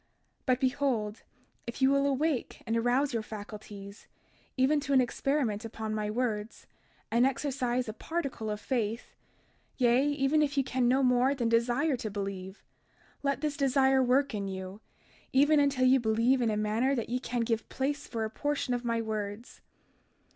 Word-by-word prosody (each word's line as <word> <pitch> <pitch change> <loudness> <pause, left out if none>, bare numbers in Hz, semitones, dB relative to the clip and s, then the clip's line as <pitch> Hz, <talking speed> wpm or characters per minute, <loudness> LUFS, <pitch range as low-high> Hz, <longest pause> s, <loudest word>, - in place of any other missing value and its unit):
32:27 - - -42 0.4
But 255 -1 +3
behold, 255 -5 0 0.4
if 235 - -5
ye 265 - +5
will 275 +1 +3
awake 280 -1 -1
and 225 -1 -1
arouse 245 +4 +1
your 230 - 0
faculties, 205 -1 -9 0.5
even 270 +4 +3
to 280 -1 -2
an 265 - +6
experiment 250 -3 0
upon 220 -1 -5
my 210 -1 -2
words, 220 -2 -3 0.5
and 235 +2 +4
exercise 255 -2 0
a 215 - -4
particle 275 -6 -4
of 210 0 -3
faith, 230 -2 -2 0.6
yea, 245 +1 +4
even 290 +1 +2
if 290 -1 0
ye 275 - +4
can 255 -1 0
no 260 +2 +3
more 250 +2 +3
than 240 -4 0
desire 240 +6 +2
to 230 -3 -4
believe, 195 -1 -6 0.6
let 280 -1 -1
this 300 -1 -1
desire 270 -2 +3
work 260 +1 +2
in 200 -2 -3
you, 190 +2 -6 0.5
even 290 +3 +5
until 280 -3 +2
ye 260 +1 +5
believe 235 +3 +2
in 235 - +2
a 210 - 0
manner 220 +6 +1
that 230 -3 -3
ye 250 +1 0
can 245 -2 -2
give 225 -1 -1
place 280 +2 -2
for 225 -2 -2
a - - -3
portion 290 -2 -1
of 245 0 -2
my 230 -1 0
words. 215 +1 -5
245 Hz, 175 wpm, -30 LUFS, 220-275 Hz, 0.6 s, an